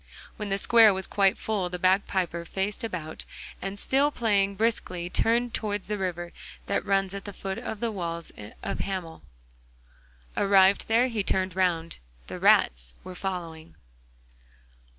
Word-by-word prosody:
When 210 -2 -5
the 195 - +1
square 225 -1 +6
was 190 0 -1
quite 195 -1 +2
full 200 -5 -2
the 180 - -4
bagpiper 185 -2 +1
faced 195 +5 -3
about, 170 -8 -5 0.4
and, 195 +1 -4
still 275 +6 +2
playing 205 -7 +1
briskly, 185 -5 -1
turned 235 +1 +1
towards 205 -2 -2
the 210 0 -2
river 175 -2 -3 0.3
that - - 0
runs 195 -1 +1
at 200 0 -6
the 205 - -5
foot 195 0 -5
of 220 - -5
the 235 -1 0
walls 170 -4 -4 0.3
of - - -3
Hamel. 185 - -4 1.1
Arrived 195 0 +4
there 230 +3 +4
he 225 -4 -1
turned 190 -2 0
round; 170 -3 0 0.3
the - - -7
rats - - +3
were 185 - -8
following. 170 -4 -5
195 Hz, 150 wpm, -27 LUFS, 180-210 Hz, 1.1 s, square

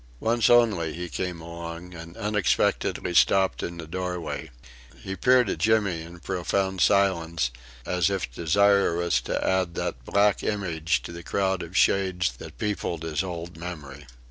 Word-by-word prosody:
Once 115 - +2
only 110 -10 +3
he 90 +1 -5
came 90 0 -4
along, 85 +1 -8
and 85 0 -10
unexpectedly 105 -4 0
stopped 95 +2 +4
in 85 0 -5
the 85 - -7
doorway. 90 -1 -4 0.5
He 95 - -5
peered 125 +5 +4
at - - -2
Jimmy 105 -6 +2
in 85 +2 -11
profound 95 +1 -1
silence, 85 -9 +2 0.3
as 90 -3 +1
if 95 -11 -2
desirous 85 +1 +2
to - - -2
add 95 -2 +1
that 60 - -3
black 100 +7 +2
image 85 -6 -1
to - - -7
the 85 0 -8
crowd 95 +1 0
of 85 +3 -5
Shades 95 -5 +2
that - - -11
peopled 100 -6 -2
his 80 0 -1
old 85 -2 -6
memory. 75 -5 -8
90 Hz, 150 wpm, -26 LUFS, 85-100 Hz, 0.5 s, stopped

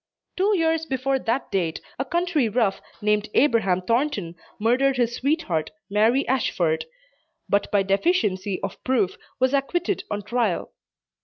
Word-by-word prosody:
Two 400 +2 +2
years 325 -1 +1
before 265 0 0
that 245 +2 -2
date, 170 -4 -1 0.2
a 270 - 0
country 340 -5 +1
"rough" 215 -3 +1 0.2
named 210 0 +1
Abraham 210 -9 +3
Thornton, 230 - 0 0.3
murdered 255 +5 +2
his 240 -1 +1
sweetheart, 275 - 0 0.2
Mary 225 +6 +3
Ashford, 175 -11 +1 0.6
but 200 0 +1
by 200 -1 +2
deficiency 195 - +1
of - - -5
proof 230 -8 +1 0.2
was 260 +1 +2
acquitted 350 +7 0
on 205 0 -3
trial. 220 -3 -1
240 Hz, 135 wpm, -24 LUFS, 200-275 Hz, 0.6 s, Abraham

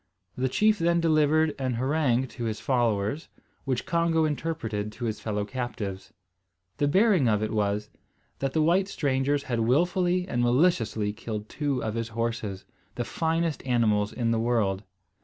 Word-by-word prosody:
The 130 +1 0
chief 215 +8 +3
then 170 +1 +2
delivered 155 -1 +3
an 130 -2 -1
harangue 130 0 +1
to 120 - -6
his 110 -1 -2
followers, 120 +1 0 0.4
which 130 -3 -1
Congo 165 -1 +2
interpreted 125 -9 -3
to 120 +2 -5
his 110 -1 -2
fellow 105 -2 -2
captives. 105 -5 -5 0.7
The 145 - +2
bearing 185 - +4
of 105 0 +1
it 110 - -2
was, 105 0 -1 0.5
that 135 -1 -2
the 155 - +2
white 180 +4 +3
strangers 140 -4 0
had 120 -3 -2
wilfully 175 +9 +2
and 120 -9 -1
maliciously 120 -5 +2
killed 105 -1 -6
two 140 -4 -2
of 110 - -2
his 115 0 -2
horses, 115 -4 -3 0.3
the - - -2
finest 165 -2 -1
animals 110 -5 +2
in 115 -2 -1
the 115 - +1
world. 110 -5 +1
125 Hz, 160 wpm, -27 LUFS, 110-155 Hz, 0.7 s, bearing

